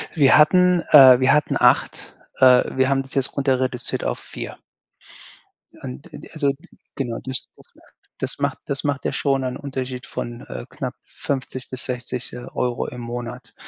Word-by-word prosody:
Wir 140 -5 +5
hatten 180 +3 +5
äh, 130 -4 +9
wir 130 +1 +4
hatten 150 0 +1
8, - - +2 0.2
äh 130 -1 +7
wir 130 0 +3
haben 135 0 +2
das 135 - -10
jetzt 135 -1 +1
runter 135 -2 +1
reduziert 130 -1 -2
auf - - -2
4. - - -8 1.2
Und 65 +1 -9
und - - -11
also, 145 -3 +1
g 155 +7 -19 0.3
genau, 120 -4 -3
das 130 0 -4
das - - -19 0.5
das - - -3
macht - - -1
das 140 -1 0
macht 145 -1 -2
ja - - 0
schon 135 -2 0
einen 125 -1 -3
Unterschied 130 -2 -5
von, 120 0 -6
äh, - - -7
knapp - - -5
50 130 -2 -5
bis 130 -2 -4
60, 125 0 -5
äh, 125 0 -8
Euro 125 -1 -2
im 125 - -8
Monat. 120 +1 -7
130 Hz, 175 wpm, -22 LUFS, 125-140 Hz, 1.2 s, äh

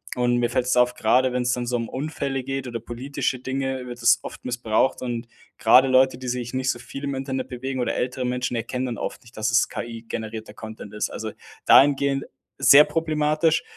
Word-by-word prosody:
Und 120 0 +1
mir 120 -1 0
fällt's 125 0 +1
auf, 125 0 +4
grade 125 +3 +2
wenn's 125 0 +1
dann 125 -1 -2
so 120 0 0
Unfälle 135 +2 -3
geht 135 0 -4
oder 120 -1 -4
politische 125 +3 -3
Dinge, 130 0 -3
wird 120 -1 -8
es 120 -1 +5
oft - - -10
missbraucht. 120 0 0
Und 120 -1 -4 0.3
gerade 130 +4 +6
Leute, 130 -1 +3
die 130 - -7
sich 125 -1 -3
nicht 130 0 -1
so 120 - 0
viel 135 +4 -8
im 140 -1 -2
Internet 130 -1 -3
bewegen 130 +1 -5
oder 120 -2 -1
ältere 130 +1 -2
Menschen 125 0 -2
erkennen 125 +3 -3
dann 120 -2 -4
oft - - -5
nicht, 115 - -18
dass 110 +2 -1
es 115 - +3
KI-generierter 110 -1 -6
Content 110 -2 -9
ist. 105 - -2
Also, - - -5 0.3
dahingehend 140 0 +5 0.3
sehr 145 +2 +8
problematisch. 155 0 +1
125 Hz, 190 wpm, -24 LUFS, 120-135 Hz, 0.3 s, sehr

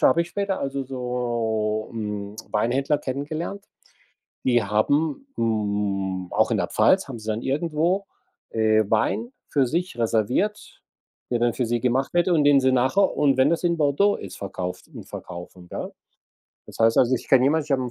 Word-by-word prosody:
habe 170 - +5
ich 170 - -2
später, 200 0 -2
also, 135 0 -3
so, 120 -4 -2
hm, 105 -2 -5 0.2
Weinhändler 135 +7 +1
kennengelernt. 155 +9 -4 0.8
Die 120 -2 +3
haben 145 - 0
hm, 100 -4 -1
auch - - +3
in - - +1
der - - 0
Pfalz 190 -4 +3
haben 125 -4 -7
sie 110 - -11
dann 110 +1 -2
irgendwo, 165 +7 0 0.4
äh, 110 -1 +3
Wein 110 +2 0 0.2
für 135 -4 +2
sich 175 +1 -2
reserviert, 115 - -1 0.5
der 120 - +1
dann 120 -1 +2
für 125 -3 -1
sie 120 -1 0
gemacht 130 +6 0
wird 175 +1 +3
und 160 -4 +3
den 145 -1 +6
sie 130 0 +3
nachher- 130 +11 +2
und 140 -3 +3
wenn 135 +5 +4
das 170 - 0
in 170 -1 +1
Bordeaux 155 +8 +3
ist- - - -8
verkauft 90 -2 -5
und - - -10
verkaufen, 90 0 -9
gell? - - -5 0.8
Das - - -12
heißt 115 0 +4
also, 130 +1 +4
ich - - -5
kenne 130 -1 +5
jemand, 150 +2 +2
ich 150 - -16
habe 130 -2 +2
'n 125 - -4
130 Hz, 180 wpm, -24 LUFS, 110-150 Hz, 0.8 s, den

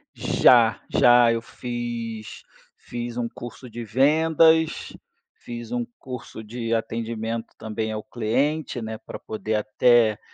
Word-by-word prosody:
Já. 115 -3 +4
Já, 120 -1 +6
eu 115 - -2
fiz 115 -2 -6 0.3
fiz 120 0 -6
um 120 -1 -1
curso 120 +2 -10
de 120 +1 -6
vendas, 160 +6 +3 0.4
fiz 120 -1 -8
um 120 -1 -1
curso 125 -3 -8
de 115 +1 -4
atendimento, 115 0 -3
também, 110 0 -3
ao 110 -1 -4
cliente, 130 +4 -1
né, 110 0 -5
para - - -9
poder 110 0 -3
até, 110 +1 +3
115 Hz, 120 wpm, -24 LUFS, 110-125 Hz, 0.4 s, Já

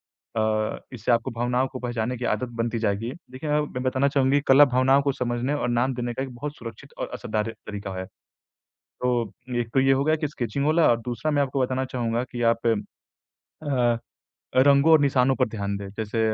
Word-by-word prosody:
अ, 110 -1 -2
इससे 120 +1 -1
आपको 115 -1 +1
भावनाओं 125 +2 0
को 130 -1 -8
पहचानने 120 0 -2
की 120 - -4
आदत 120 +3 -3
बनती 115 0 0
जाएगी। 110 +2 -1 0.2
देखिए 135 +4 -6
मैं 150 - +3
मैं 125 - -3
बताना 130 +1 +2
चाहूँगी 140 0 +3
कला 140 +2 +8
भावनाओं 130 +1 +3
को 140 0 +1
समझने 125 +1 -2
और 135 -4 -1
नाम 120 +2 +1
देने 120 -1 -3
का 130 - -3
एक 135 - -6
बहुत 145 +4 -5
सुरक्षित 115 -1 -10
और - - -4
असरदार 110 +1 -2 0.2
तरीका 100 -2 -5
है। 95 - -4 1.0
तो 120 -4 0 0.3
एक 115 - -3
तो 135 - +5
ये 135 0 +4
हो 135 +1 +2
गया 155 +1 +3
कि 150 -1 -2
स्केचिंग 130 0 -3
वाला, 155 -5 +4
दूसरा 120 +6 -3
मैं 145 -1 +3
आपको 135 0 -1
बताना 130 +1 0
चाहूँगा 120 -2 -2
कि 120 -1 -3
आप 115 0 -5 0.8
अ, 125 -6 -1 0.6
रंगों 140 +4 +6
और 160 - +7
निशानों 135 -2 +3
पर 130 - +1
ध्यान 100 -2 -3
दें। 100 0 -6
जैसे 110 +1 -2
125 Hz, 200 wpm, -25 LUFS, 115-135 Hz, 1.0 s, कला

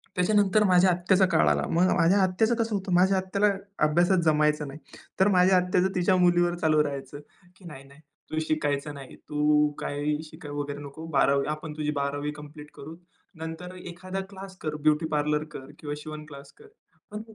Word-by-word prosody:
त्याच्यानंतर 205 +3 +3
माझ्या 185 -1 +4
आत्याचा 180 +2 +3
काळ 160 - +3
आला. - - +1
मग 180 +3 +2
माझ्या 175 +3 +3
आत्याचं 220 +6 +1
कसं 225 -2 -1
होतं, 190 -1 -4
माझ्या 190 +2 +4
आत्याला 195 +2 +1 0.4
अभ्यासात 175 +4 +3
जमायचं 150 -1 +2
नाही. 140 +3 -9 0.4
तर 190 - +5
माझ्या 185 +1 +5
आत्याचं 180 +1 +1
तिच्या 180 +1 +2
मुलीवर 175 -1 +3
चालू 155 -1 +3
राहायचं, 145 0 -6 0.4
की 185 - -18
"नाही, 135 -5 -10
नाही. 140 +2 -18 0.3
तू 155 - -1
शिकायचं 145 -1 -1
नाही. 135 -2 -11
तू 150 0 +1
काही 150 +1 -2
शिकाय 155 -1 -11
वगैरे 145 0 -4
नको. 145 +3 -9
12वी 140 0 +2
आपण 155 0 -5
तुझी 150 0 -1
बारावी 145 +1 -2
कंप्लीट 150 0 -12
करू. 160 +4 -10 0.4
नंतर 165 +3 -7
एखादा 185 +2 -7
क्लास 190 -1 -10
कर 155 -1 -3
ब्युटी 155 +1 +3
पार्लर 150 0 0
कर 135 -3 -9
किंवा 145 -1 -5
शिवण 155 0 -8
क्लास 140 -2 -12
कर." 440 0 -17 0.4
पण 210 +1 -5
160 Hz, 175 wpm, -26 LUFS, 150-185 Hz, 0.4 s, तर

